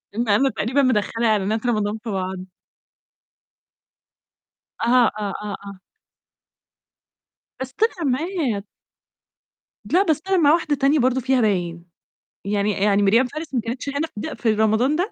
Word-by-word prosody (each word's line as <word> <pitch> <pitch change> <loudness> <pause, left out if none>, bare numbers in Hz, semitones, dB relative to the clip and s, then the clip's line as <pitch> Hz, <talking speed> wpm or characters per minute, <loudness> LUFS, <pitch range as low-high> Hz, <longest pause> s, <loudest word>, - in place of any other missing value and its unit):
إم 235 +2 -1
أنا 255 +7 +4
تقريبًا 235 +5 0
مدخلة 230 -2 +1
إعلانات 215 +1 0
رمضان 215 -3 0
في 235 - -5
بعض. 190 -1 -3 2.5
أها، 240 -1 +4
آه، 200 -2 -3
آه، 205 -2 -4
آه. 200 -1 -9 1.8
بس 260 0 -5
طلعت 430 +2 0
معاه. 275 - -1 1.2
لا، 370 +4 +3
بس 315 -5 0
أنا 385 - +3
مع 300 -3 +5
واحدة 315 -3 +1
تانية 280 +2 +2
برضه 255 0 +2
فيها 260 0 +2
باين، 175 -5 -1 0.6
يعني 205 +1 0
يعني 200 +1 +2
ميريام 225 +6 +4
فارس 305 +3 -7
ما 245 - +2
كنتش 235 +5 -5
هنا 285 +3 -2
ده 305 +9 -5
ف - - -16
في 230 - +3
رمضان 220 +4 +2
ده؟ - - -4
235 Hz, 145 wpm, -22 LUFS, 210-280 Hz, 2.5 s, مع